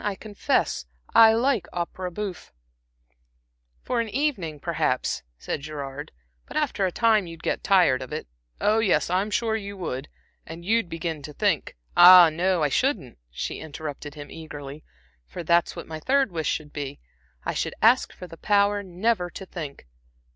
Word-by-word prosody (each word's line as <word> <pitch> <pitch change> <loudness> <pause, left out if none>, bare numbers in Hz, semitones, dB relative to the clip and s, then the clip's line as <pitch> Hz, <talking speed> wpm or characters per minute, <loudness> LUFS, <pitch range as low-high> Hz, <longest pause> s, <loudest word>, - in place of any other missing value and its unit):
I 205 -1 -1
confess 200 - -1 0.3
I 225 -1 +8
like 240 -1 +1
opera 180 +1 -4
bouffe." 190 0 -6 1.3
"For 245 -2 0
an 230 - -4
evening, 205 - -1
perhaps," 155 -6 -1 0.2
said 65 - -4
Gerard, 145 -1 -6 0.4
"but - - -5
after 265 -10 +1
a - - -3
time 220 -2 +3
you'd 165 0 -10
get - - -1
tired 180 -10 +4
of 130 - -8
it 155 - -4 0.3
oh, 215 +2 +3
yes, 200 -5 +2
I'm 190 +3 +1
sure 220 +1 0
you 200 -2 -5
would 145 -6 -4 0.4
and 165 +2 -10
you'd 220 -2 +1
begin 165 -2 -4
to 150 +1 -9
think" - - 0 0.2
"Ah, 175 -1 +10
no, 175 +1 +1
I 145 - +2
shouldn't," 145 - -1
she - - -5
interrupted 150 -1 -7
him, 145 -1 -9
eagerly 150 -2 -9 0.4
"for 175 - -7
that's 170 +1 +2
what - - -7
my 160 -1 -7
third 270 - +2
wish 160 -3 -2
should 150 -1 -3
be. 145 -1 -5 0.5
I - - -1
should - - -2
ask - - +4
for 180 - -10
the 165 -2 -12
power 205 +1 +2
never 185 0 -1
to 190 - -9
think. 150 - -8
175 Hz, 170 wpm, -25 LUFS, 150-205 Hz, 1.3 s, Ah